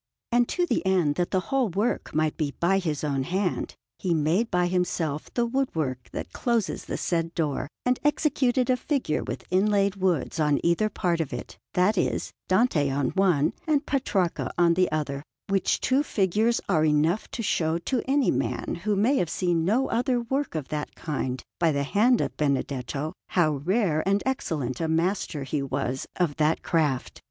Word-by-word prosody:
And 240 Hz, 0 st, +3 dB
to 355 Hz, -, +1 dB
the -, -, 0 dB
end 185 Hz, -6 st, +2 dB
that 175 Hz, +3 st, -1 dB
the 190 Hz, -, +1 dB
whole 260 Hz, -5 st, +2 dB
work 205 Hz, +7 st, -1 dB
might 155 Hz, 0 st, +1 dB
be 145 Hz, -3 st, -2 dB
by 190 Hz, +3 st, +3 dB
his 155 Hz, -6 st, -2 dB
own 140 Hz, -3 st, 0 dB
hand, 180 Hz, +6 st, -1 dB, 0.2 s
he 175 Hz, -3 st, 0 dB
made 165 Hz, +9 st, +1 dB
by 180 Hz, 0 st, +2 dB
himself 175 Hz, -4 st, -1 dB
the 240 Hz, -, +2 dB
wood 265 Hz, +3 st, 0 dB
work 130 Hz, -6 st, -2 dB
that -, -, -6 dB
closes 235 Hz, -5 st, -1 dB
the -, -, -3 dB
said 165 Hz, -1 st, -1 dB
door, 150 Hz, -4 st, -1 dB, 0.2 s
and 250 Hz, 0 st, +2 dB
executed 270 Hz, -4 st, +2 dB
a 250 Hz, -, +2 dB
figure 270 Hz, -, -1 dB
with -, -, -6 dB
inlaid 200 Hz, +1 st, +2 dB
woods 180 Hz, -3 st, 0 dB
on 150 Hz, -2 st, +3 dB
either 170 Hz, +6 st, +2 dB
part 170 Hz, -5 st, 0 dB
of 155 Hz, -, -4 dB
it, 125 Hz, -, -6 dB, 0.2 s
that 185 Hz, +2 st, +3 dB
is, -, -, -1 dB, 0.2 s
Dante 185 Hz, -, +3 dB
on 140 Hz, 0 st, 0 dB
one 180 Hz, -7 st, +2 dB
and 300 Hz, -1 st, +2 dB
Petrarca 200 Hz, -11 st, 0 dB
on 170 Hz, -1 st, +5 dB
the 180 Hz, -1 st, +2 dB
other; 145 Hz, -3 st, -2 dB, 0.3 s
which 195 Hz, -2 st, +1 dB
two 265 Hz, +2 st, +2 dB
figures 215 Hz, -, +1 dB
are 155 Hz, -, +2 dB
enough 155 Hz, +6 st, +2 dB
to 230 Hz, -, -4 dB
show 160 Hz, -5 st, +1 dB
to 235 Hz, +8 st, -1 dB
any 275 Hz, 0 st, +3 dB
man 125 Hz, +5 st, -2 dB
who 210 Hz, 0 st, +1 dB
may 235 Hz, +8 st, +3 dB
have 175 Hz, -, 0 dB
seen 175 Hz, -2 st, 0 dB
no 235 Hz, +8 st, +2 dB
other 245 Hz, +1 st, +1 dB
work 265 Hz, -, -2 dB
of 150 Hz, -4 st, -4 dB
that 150 Hz, -1 st, -4 dB
kind 130 Hz, -4 st, -3 dB, 0.2 s
by 165 Hz, -2 st, +3 dB
the 140 Hz, -1 st, 0 dB
hand 225 Hz, -, +3 dB
of -, -, -2 dB
Benedetto, 140 Hz, +1 st, -1 dB, 0.2 s
how 155 Hz, -5 st, +2 dB
rare 170 Hz, -, +1 dB
and 200 Hz, +1 st, +2 dB
excellent 155 Hz, -, -2 dB
a 165 Hz, -, 0 dB
master 165 Hz, -2 st, 0 dB
he 140 Hz, +2 st, -2 dB
was 135 Hz, -1 st, -2 dB
of 170 Hz, -6 st, 0 dB
that 155 Hz, +1 st, +1 dB
craft. 150 Hz, -7 st, 0 dB
175 Hz, 185 wpm, -26 LUFS, 150-220 Hz, 0.3 s, on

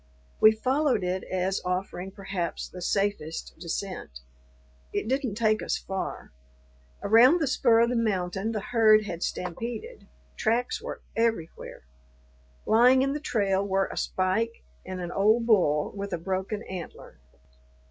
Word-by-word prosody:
We 215 Hz, -, +8 dB
followed 260 Hz, +1 st, +1 dB
it 180 Hz, +1 st, -2 dB
as 185 Hz, +1 st, -1 dB
offering 180 Hz, 0 st, -3 dB
perhaps 190 Hz, -3 st, -4 dB
the 180 Hz, -, -10 dB
safest 195 Hz, -4 st, -2 dB
descent. 170 Hz, -, -5 dB, 0.7 s
It -, -, -2 dB
didn't 260 Hz, -4 st, -1 dB
take 215 Hz, -1 st, +2 dB
us -, -, -1 dB
far. 190 Hz, -, -5 dB, 0.7 s
Around 245 Hz, +10 st, +6 dB
the 315 Hz, -, +1 dB
spur 235 Hz, -4 st, +3 dB
of 235 Hz, -, +3 dB
the -, -, 0 dB
mountain 195 Hz, -2 st, -1 dB
the 215 Hz, -2 st, -3 dB
herd 215 Hz, -1 st, +4 dB
had 170 Hz, -4 st, -5 dB
stampeded; 230 Hz, -, -5 dB, 0.3 s
tracks 235 Hz, +3 st, 0 dB
were -, -, -7 dB
everywhere. 225 Hz, -, -2 dB, 0.8 s
Lying 250 Hz, +4 st, +5 dB
in 275 Hz, 0 st, 0 dB
the 295 Hz, -, -3 dB
trail 200 Hz, -9 st, 0 dB
were 195 Hz, -1 st, 0 dB
a -, -, -7 dB
spike 220 Hz, +5 st, -1 dB, 0.2 s
and 185 Hz, 0 st, -6 dB
an 175 Hz, 0 st, -4 dB
old 220 Hz, +4 st, +3 dB
bull 175 Hz, -10 st, +3 dB
with 200 Hz, 0 st, -5 dB
a -, -, 0 dB
broken 190 Hz, +5 st, -3 dB
antler. 180 Hz, -, -9 dB
200 Hz, 140 wpm, -27 LUFS, 185-230 Hz, 0.8 s, We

